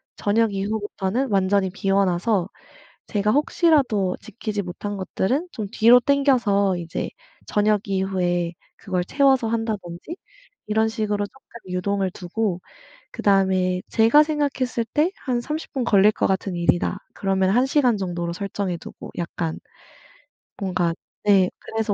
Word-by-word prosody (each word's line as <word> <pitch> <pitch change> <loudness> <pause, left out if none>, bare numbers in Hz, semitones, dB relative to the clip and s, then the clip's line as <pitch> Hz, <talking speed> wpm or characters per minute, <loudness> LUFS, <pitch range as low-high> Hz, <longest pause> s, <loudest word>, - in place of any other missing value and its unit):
저녁 215 0 +1
이후부터는 205 +4 -2
완전히 195 -1 +2
비워 195 +1 +1
놔서 185 +1 0 0.6
제가 210 0 +1
혹시라도 275 - +2
지키지 215 -1 -4
못한 200 +3 -5
것들은 255 - -1
좀 215 -4 -5
뒤로 235 +3 +6
당겨서 240 -9 +2
이제 170 -1 -4 0.4
저녁 210 -1 +2
이후에 180 -3 0 0.2
그걸 185 -2 -2
채워서 265 +1 +3
한다든지 220 - -4 0.5
이런 220 +1 +2
식으로 210 -2 -1
쪼끔 235 -2 -16
유동을 190 +1 -1
두고 185 +1 -2 0.5
그다음에 190 -2 +2
제가 230 +7 +5
생각했을 280 -6 -1
때 310 +4 +3 0.2
'한 245 -3 0
30 305 +6 -5
분 265 -4 -1
걸릴 210 -2 +5
것 - - 0
같은 190 -1 -1
일이다.' 175 +3 +1 0.2
그러면 190 -1 +1
1 245 +6 +3
시간 265 -5 +2
정도로 175 -3 -3
설정해 195 -1 -3
두고 - - -10
약간 170 -1 -3 1.0
뭔가 180 -3 0 0.3
네 195 -3 +5
그래서 220 -2 -2
205 Hz, 285 characters per minute, -23 LUFS, 185-235 Hz, 1.0 s, 뒤로